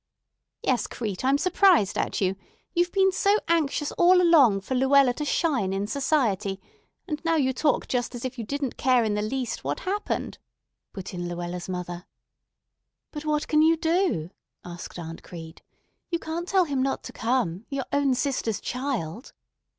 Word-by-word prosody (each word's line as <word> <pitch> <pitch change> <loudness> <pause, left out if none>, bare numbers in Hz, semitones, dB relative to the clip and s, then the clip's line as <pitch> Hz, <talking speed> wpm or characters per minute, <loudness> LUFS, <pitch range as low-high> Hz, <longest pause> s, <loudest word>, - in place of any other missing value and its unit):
"Yes, 250 -4 +1
Crete, 210 -4 -5
I'm 270 +2 +3
surprised 360 - +4
at - - -1
you. 190 0 +1 0.4
You've 350 0 +1
been 385 -1 +3
so 400 +2 +3
anxious 300 -3 +1
all 360 +1 +6
along 290 - +5
for 195 - -4
Luella 265 0 +4
to 300 - -4
shine 270 - +1
in 195 +1 -1
society, 215 -6 0 0.5
and 300 -2 -4
now 330 0 +2
you 265 -4 +2
talk 290 +1 +1
just 245 0 -2
as 245 - -6
if 255 -1 -5
you - - -2
didn't 275 +2 -3
care 255 -2 +3
in 215 -2 0
the 210 - 0
least 240 +2 -3
what - - -3
happened," 405 +3 -3 0.5
put 190 0 -8
in 175 -1 -4
Luella's 175 +1 -5
mother. 180 -1 -5 1.0
"But 300 -1 -7
what 300 -1 0
can 305 0 +3
you 325 +1 +5
do?" 325 - 0 0.3
asked 175 0 -8
Aunt 165 -1 -7
Crete. 165 -2 -10 0.5
"You 340 - 0
can't 335 +2 -5
tell 380 -1 +4
him 280 -4 -1
not 270 +1 -1
to - - -8
come—your 240 +2 -1
own 280 -2 +2
sister's 250 -5 -1
child!" 250 - -4
260 Hz, 165 wpm, -26 LUFS, 200-310 Hz, 1.0 s, all